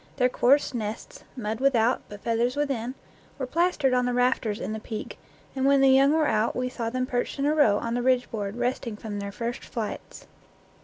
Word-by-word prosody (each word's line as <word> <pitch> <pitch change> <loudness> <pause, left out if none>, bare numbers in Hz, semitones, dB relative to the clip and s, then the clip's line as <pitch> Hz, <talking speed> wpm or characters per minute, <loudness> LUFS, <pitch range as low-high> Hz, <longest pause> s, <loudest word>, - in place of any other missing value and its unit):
Their 250 -1 +3
coarse 265 +4 +3
nests 220 -2 -5
mud 220 -1 -3
without, 255 -3 +2
but 205 -1 -10
feath 230 0 +1
ers 250 +2 0
within 265 -4 -2 0.4
were 270 - -2
plastered 300 -2 +1
on 250 0 +2
the 245 - -1
rafters 245 -4 +1
in 215 - -4
the 220 - -4
peak, 215 0 -7 0.4
and 265 - -1
when 275 0 +5
the 270 0 +6
young 270 +2 +5
were 315 0 +3
out 220 -4 +1
we 250 0 -1
saw 235 -3 -3
them 255 +1 -1
perched 245 +1 -2
in 275 - 0
a 295 - +3
row 255 -10 +4
on 230 +2 -3
the 245 - 0
ridge 255 0 +1
board, 205 -2 -4
resting 245 -2 -2
from 210 -2 -6
their 200 0 -5
first 235 +3 -4
flights. 225 -3 -6
245 Hz, 215 wpm, -26 LUFS, 225-265 Hz, 0.4 s, the